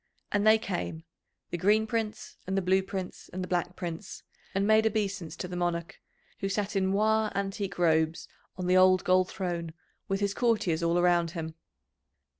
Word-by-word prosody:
And 205 +1 +2
they 220 0 +8
came, 175 -6 -4 0.5
the 175 - -3
Green 210 +4 +3
Prince, 220 -1 -3
and 190 +1 -1
the - - +2
Blue 190 +1 +3
Prince, 190 -1 -6
and 185 0 -4
the - - -5
Black 180 0 -1
Prince, 175 +2 -6 0.3
and 195 +1 +2
made 220 +1 +5
obeisance 200 -5 -2
to 180 - -5
the 180 - -6
Monarch, 175 -1 -2 0.4
who 195 - -2
sat 205 +1 -2
in 190 -1 +2
moiré 215 +2 +2
antique 195 -1 -3
robes, 160 -2 +2 0.3
on 180 - -3
the 180 +1 +3
old 185 0 +6
gold 185 0 +3
throne, 170 -3 -4 0.3
with 195 0 0
his 200 -1 0
courtiers 210 -9 +1
all 170 +1 +2
around 175 -1 +3
him. 160 -1 -4
185 Hz, 180 wpm, -29 LUFS, 175-205 Hz, 0.5 s, they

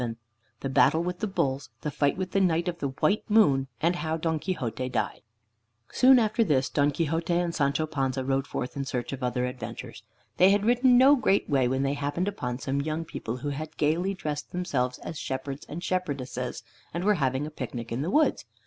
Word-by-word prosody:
VII 115 -2 -3 0.5
THE 135 - -2
BATTLE 160 +4 +4
WITH 180 0 -3
THE 215 - -1
BULLS; 135 -8 -1
THE 150 - -3
FIGHT 145 +2 +1
WITH 185 -1 -3
THE 195 - +2
KNIGHT 170 -1 +2
OF 170 -1 -3
THE 140 - -1
WHITE 150 +10 +1
MOON; 145 -12 +4
AND 175 +2 +2
HOW 160 -1 -2
DON 160 -1 -1
QUIXOTE 130 - -3
DIED - - -2 0.7
Soon 260 0 +6
after 225 0 +2
this, 140 -9 +1
Don 145 0 +3
Quixote 165 +3 -1
and 175 -1 0
Sancho 140 +1 +1
Panza 135 -3 -2
rode 135 +1 0
forth 125 0 -4
in 140 - -2
search 130 -1 -3
of 135 - -6
other 125 0 0
adventures. 125 0 -7 0.4
They 185 - +7
had 205 +1 +2
ridden 245 +1 +5
no 270 +3 +7
great 200 -6 +2
way 135 -4 +2
when 130 +2 0
they 140 0 +1
happened 145 +6 -2
upon 125 -12 -3
some 135 +1 -2
young 155 +2 -3
people 125 -7 -5
who 145 +3 -4
had 155 +2 -6
gaily 170 +6 +1
dressed 150 -4 -4
themselves 135 -9 -1
as 160 - -6
shepherds 135 +1 -5
and 170 +4 -6
shepherdesses, 135 -10 -3 0.3
and 170 - -2
were 210 +2 +4
having 130 +2 +1
a 155 - -6
picnic 120 -5 -6
in 120 +3 -2
the 160 - -2
woods. 305 +10 +2
150 Hz, 210 wpm, -27 LUFS, 135-180 Hz, 0.7 s, They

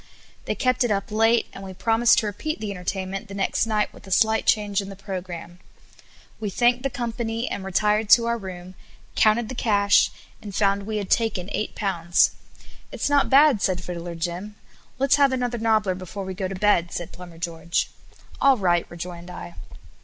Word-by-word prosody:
They - - -1
kept 255 -1 +1
it 245 - 0
up 200 0 -1
late, 225 +2 +3
and 195 - -9
we 190 -1 -8
promised 225 +3 +3
to 230 - +2
repeat 310 +10 -3
the 215 -2 -4
entertainment 190 +2 -4
the 200 - -8
next 195 +3 0
night 215 -1 0
with - - -15
a - - -10
slight 220 +3 +2
change 205 -2 +2
in 195 - -8
the 195 - -8
programme. 180 -3 -7 0.8
We 210 - -3
thanked 240 +5 +2
the 275 - -1
company, 235 -1 -3
and 195 - -4
retired 210 +3 +1
to 230 +1 +7
our 235 0 +1
room, 185 -2 -8 0.4
counted 220 +1 +3
the 260 - -6
cash, 205 -4 +3 0.3
and 205 -3 -8
found 200 -1 +1
we 215 -1 -2
had 200 -2 -4
taken 205 -5 +1
eight 215 - -3
pounds. 175 -4 +2 0.6
"It's - - -2
not 285 -1 +3
bad," 275 -5 +6
said 185 -2 0
Fiddler 170 -1 -6
Jim. 175 +5 -4 0.4
"Let's 275 +2 +3
have 280 -1 +4
another 245 -2 -1
nobbler 220 -4 +2
before 185 +2 -7
we 190 - -4
go 190 0 -3
to 190 - -5
bed," 185 -3 +2
said 175 - -5
Plumber 175 -2 -11
George. 170 0 -2 0.5
"All 275 -1 +5
right," 175 -4 +1
rejoined 175 0 -8
I. 85 - -8
205 Hz, 190 wpm, -24 LUFS, 185-225 Hz, 0.8 s, to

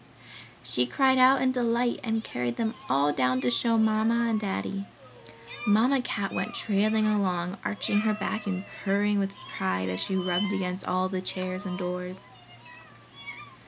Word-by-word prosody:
She 125 0 0
cried 260 - +3
out 260 +1 +6
in 260 - +3
delight 240 -1 0
and 225 -2 -1
carried 120 - -3
them 225 -1 -1 0.2
all 140 +3 +3
down 130 -2 +1
to 125 -1 +1
show 230 - +2
to 220 - +4
Mamma 225 +2 +2
and 215 - +1
Daddy. 200 -1 -3 0.8
Mamma 240 +6 +4
Cat 200 -5 -3
went - - -3
trailing 215 +1 +2
along, 185 -4 0
arching 205 0 0
her 215 0 +1
back 215 0 -3
and 190 -1 -2 0.2
purring 205 +1 +2
with 195 0 -1 0.2
pride 95 0 -1
as 90 0 -3
she 195 - 0
rubbed 185 +2 0
against 185 -1 -3
all 185 +1 +1
the 185 -1 -3
chairs 185 +1 -4
and 180 -1 -4
doors. 180 0 -4
200 Hz, 160 wpm, -27 LUFS, 180-220 Hz, 0.8 s, out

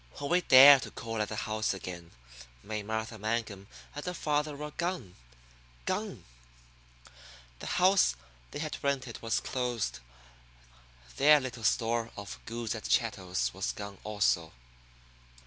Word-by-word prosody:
When 140 - -4
we 180 +1 +4
dared 135 -2 +9
to - - -6
call 115 -1 -4
at 105 - -2
the 110 - -4
house 110 -2 -1
again 90 -3 -8 0.5
May 105 0 -4
Martha 110 +1 -4
Mangum 110 -2 -3 0.3
and 145 - -6
her 180 0 -4
father 150 -1 -1
were 150 +1 -6
gone. 170 - -3 0.7
Gone! - - -3 1.4
The - - -7
house 185 - +4 0.3
they - - -7
had 155 +1 -5
rented 135 -4 -2
was 115 -1 0
closed. 120 - -2 1.2
Their 150 +2 +7
little 125 -3 -6
store 115 +1 +1
of 100 -1 -7
goods 115 -1 -3
and 110 - -6
chattels 95 -6 0
was 95 +1 -2
gone 100 -1 -8
also. 100 -6 0
115 Hz, 135 wpm, -30 LUFS, 105-140 Hz, 1.4 s, dared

